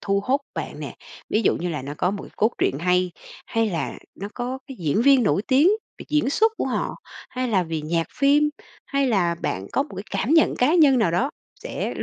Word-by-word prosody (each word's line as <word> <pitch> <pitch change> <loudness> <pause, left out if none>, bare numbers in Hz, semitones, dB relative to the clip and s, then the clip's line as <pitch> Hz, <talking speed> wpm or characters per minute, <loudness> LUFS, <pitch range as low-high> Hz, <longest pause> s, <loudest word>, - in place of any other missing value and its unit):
thu 200 0 +1
hốt 275 +3 +2
bạn - - -5
nè? - - -7 0.3
Ví 220 - +2
dụ - - +3
như 180 - -3
là 150 -5 -3
nó 145 +2 -6
có 180 - +2
một 200 0 -5
cái - - -11
cốt 220 - +3
truyện 135 - +1
hay, 180 0 +2 0.4
hay 225 -2 0
là 165 -5 -3 0.2
nó 200 +2 -6
có 250 +2 -3
cái 270 - -9
diễn 165 +7 +1
viên 275 -1 +6
nổi 205 -1 +2
tiếng 280 +7 +5 0.3
về - - -9
diễn 300 -2 +1
xuất 440 +7 +3
của - - -1
họ, - - -2 0.4
hay 255 -1 -2
là 190 -5 +2
vì 160 -2 -3
nhạc 165 +1 0
phim, 290 +1 +4 0.4
hay 275 -1 +1
là 175 -6 +2
bạn 95 - -3
có 275 - +2
một 285 - -11
cái 195 - -5
cảm 200 +7 -1
nhận 320 - +4
cá 285 +7 +3
nhân 285 -7 +6
nào 185 -7 +2
đó 250 - +1 0.3
sẽ - - -4
r - - -4
220 Hz, 240 wpm, -23 LUFS, 180-275 Hz, 0.4 s, viên